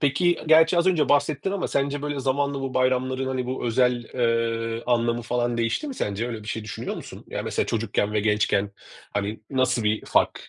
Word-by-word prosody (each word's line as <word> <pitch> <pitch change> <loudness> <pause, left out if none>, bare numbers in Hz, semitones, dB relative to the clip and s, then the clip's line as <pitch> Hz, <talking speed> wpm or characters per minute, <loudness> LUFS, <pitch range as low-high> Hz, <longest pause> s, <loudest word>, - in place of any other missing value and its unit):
Peki, 170 +5 +2
gerçi 160 +2 +6
az 170 - +2
önce 175 -5 +3
bahsettin 145 +5 +1
ama 200 - -2
sence 140 +1 -1
böyle 145 -2 -2
zamanla 140 +1 0
bu 135 -1 -4
bayramların, 130 +1 +1
hani, 130 -1 -2
bu 130 -1 -3
özel, 125 0 +2
ııı, 115 -1 0
anlamı 120 -1 +1
falan 120 0 -1
değişti 115 - -1
mi 270 - -5
sence? 105 - -2
Öyle 110 -3 -5
bir 105 - -11
şey 110 -1 -3
düşünüyor 105 - -5
musun? - - -10
Yani, - - -4
mesela, - - -1
çocukken 105 -2 -1
ve 105 - +1
gençken, 105 -1 +1 0.4
hani, 105 +1 -2
nasıl 130 -3 +1
bir 105 +1 0
fark - - +1
125 Hz, 195 wpm, -25 LUFS, 115-140 Hz, 0.4 s, gerçi